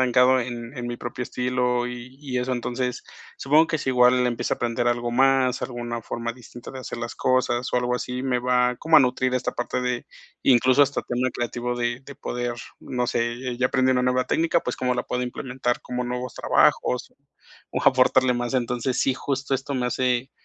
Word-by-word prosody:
he -, -, +4 dB
estancado 125 Hz, +1 st, +5 dB
en 120 Hz, +1 st, -6 dB
en 120 Hz, -1 st, -4 dB
mi 120 Hz, -, -4 dB
propio 120 Hz, +1 st, -5 dB
estilo 125 Hz, 0 st, 0 dB
y 125 Hz, +1 st, -8 dB
y 130 Hz, -4 st, -3 dB
eso, 125 Hz, +1 st, -2 dB
entonces, 125 Hz, +1 st, -3 dB, 0.3 s
supongo 155 Hz, +4 st, +4 dB
que 160 Hz, -, 0 dB
sí 135 Hz, -, -1 dB
igual 125 Hz, 0 st, +4 dB
empieza 120 Hz, -2 st, -1 dB
a -, -, -18 dB
aprender 120 Hz, 0 st, 0 dB
algo 120 Hz, 0 st, -1 dB
más, 130 Hz, 0 st, +3 dB
alguna 120 Hz, -2 st, -4 dB
forma 115 Hz, +2 st, -4 dB
distinta 120 Hz, +1 st, -12 dB
de 130 Hz, -, -7 dB
hacer 120 Hz, -, -6 dB
las 120 Hz, 0 st, -5 dB
cosas 130 Hz, -1 st, +1 dB
o -, -, +2 dB
algo 125 Hz, 0 st, +1 dB
así, 125 Hz, +1 st, -3 dB
me 125 Hz, -2 st, +1 dB
va 125 Hz, 0 st, +2 dB
como 160 Hz, +3 st, +4 dB
a -, -, +9 dB
nutrir 130 Hz, 0 st, +1 dB
esta 125 Hz, -, -1 dB
parte 120 Hz, +1 st, -2 dB
de 125 Hz, -1 st, -2 dB, 0.4 s
incluso 130 Hz, +2 st, +5 dB
hasta 140 Hz, 0 st, 0 dB
tema 125 Hz, +1 st, -1 dB
creativo 120 Hz, +1 st, -3 dB
de 120 Hz, +1 st, -1 dB
de 140 Hz, +1 st, -11 dB
poder, 120 Hz, -1 st, -3 dB, 0.2 s
no 125 Hz, -1 st, -2 dB
sé, 120 Hz, +2 st, -2 dB
ya 125 Hz, -, +3 dB
aprendí 130 Hz, 0 st, +2 dB
una 125 Hz, -1 st, +1 dB
nueva 125 Hz, 0 st, +2 dB
técnica, 165 Hz, +1 st, +2 dB
pues, 125 Hz, -, -3 dB
¿cómo 125 Hz, -1 st, 0 dB
la 125 Hz, -, -2 dB
puedo 125 Hz, 0 st, -2 dB
implementar? 125 Hz, 0 st, -2 dB
¿Cómo 125 Hz, 0 st, -3 dB
nuevos 125 Hz, +1 st, -4 dB
trabajos? 125 Hz, -, +2 dB, 0.6 s
O -, -, -2 dB
aportarle 130 Hz, -1 st, +4 dB
más. 120 Hz, +1 st, -2 dB
Entonces, 125 Hz, 0 st, -1 dB
sí, 135 Hz, -, +2 dB
justo 135 Hz, 0 st, -2 dB
esto 135 Hz, +2 st, -3 dB
me 125 Hz, -1 st, 0 dB
hace 125 Hz, +1 st, 0 dB
125 Hz, 205 wpm, -24 LUFS, 120-130 Hz, 0.6 s, a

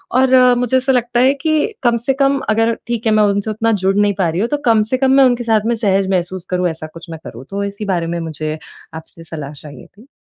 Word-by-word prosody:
और 260 Hz, 0 st, +4 dB, 0.2 s
मुझे 250 Hz, +1 st, +1 dB
ऐसा 260 Hz, +1 st, +1 dB
लगता 240 Hz, -1 st, 0 dB
है 265 Hz, +2 st, +4 dB
कि 310 Hz, +7 st, +1 dB
कम 235 Hz, -1 st, +3 dB
से 270 Hz, -, +3 dB
कम 275 Hz, 0 st, +3 dB
अगर 225 Hz, +2 st, +2 dB
ठीक 235 Hz, -1 st, -3 dB
है, 220 Hz, -, +3 dB
मैं 215 Hz, 0 st, +4 dB
उनसे 205 Hz, +1 st, 0 dB
उतना 225 Hz, +2 st, 0 dB
जुड़ 195 Hz, +1 st, +2 dB
नहीं 205 Hz, 0 st, +3 dB
पा 180 Hz, -3 st, +2 dB
रही 165 Hz, +4 st, -2 dB
हूँ 230 Hz, -, -1 dB
तो 295 Hz, -, 0 dB
कम 225 Hz, -2 st, +4 dB
से 255 Hz, -, +2 dB
कम 265 Hz, 0 st, +2 dB
मैं 270 Hz, 0 st, +6 dB
उनके 245 Hz, -1 st, +1 dB
साथ 225 Hz, -2 st, +2 dB
में 235 Hz, -, +1 dB
सहज 195 Hz, -4 st, +1 dB
महसूस 185 Hz, 0 st, -2 dB
करूँ 180 Hz, -1 st, +1 dB
ऐसा 160 Hz, -1 st, -7 dB
कुछ 165 Hz, +1 st, -12 dB
मैं 160 Hz, -, -7 dB
करूँ। 120 Hz, +3 st, -9 dB
तो 200 Hz, +1 st, -3 dB
इसी 200 Hz, +1 st, -5 dB
बारे 175 Hz, -4 st, -1 dB
में -, -, -3 dB
मुझे 155 Hz, -1 st, -4 dB, 0.4 s
आपसे 160 Hz, +1 st, -10 dB
सलाह 155 Hz, -3 st, -7 dB
चाहिए 145 Hz, -3 st, -12 dB
थी। 220 Hz, +6 st, -20 dB
210 Hz, 260 wpm, -17 LUFS, 175-240 Hz, 0.4 s, मैं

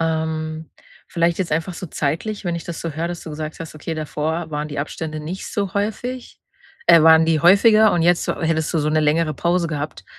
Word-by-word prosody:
Ähm, 160 Hz, -1 st, -2 dB, 0.4 s
vielleicht 170 Hz, 0 st, 0 dB
jetzt 180 Hz, -5 st, -2 dB
einfach 165 Hz, +4 st, -1 dB
so 185 Hz, -, -7 dB
zeitlich, 160 Hz, +10 st, -3 dB
wenn 175 Hz, -2 st, -1 dB
ich 165 Hz, -, -7 dB
das 170 Hz, -2 st, -6 dB
so 165 Hz, -, -3 dB
höre, 160 Hz, +3 st, -3 dB
dass 175 Hz, -1 st, -6 dB
du 160 Hz, -, -8 dB
gesagt 155 Hz, +1 st, -6 dB
hast: 160 Hz, -1 st, -7 dB
„Okay, 160 Hz, +2 st, -5 dB
davor 155 Hz, +2 st, -3 dB
waren 150 Hz, 0 st, -3 dB
die 145 Hz, -, -6 dB
Abstände 155 Hz, +1 st, -5 dB
nicht 170 Hz, +5 st, -6 dB
so 200 Hz, -3 st, -2 dB
häufig,“ 240 Hz, +5 st, -4 dB, 0.5 s
äh, 165 Hz, -, +7 dB
waren 160 Hz, 0 st, +7 dB
die 160 Hz, -1 st, +2 dB
häufiger 215 Hz, +5 st, +6 dB
und 175 Hz, -, +1 dB
jetzt 175 Hz, +1 st, +3 dB
hättest 160 Hz, 0 st, -1 dB
du -, -, +3 dB
so 150 Hz, 0 st, 0 dB
'ne 155 Hz, 0 st, +2 dB
längere 155 Hz, +1 st, +1 dB
Pause 170 Hz, +2 st, 0 dB
gehabt, 145 Hz, -10 st, -5 dB
160 Hz, 210 wpm, -21 LUFS, 155-175 Hz, 0.5 s, äh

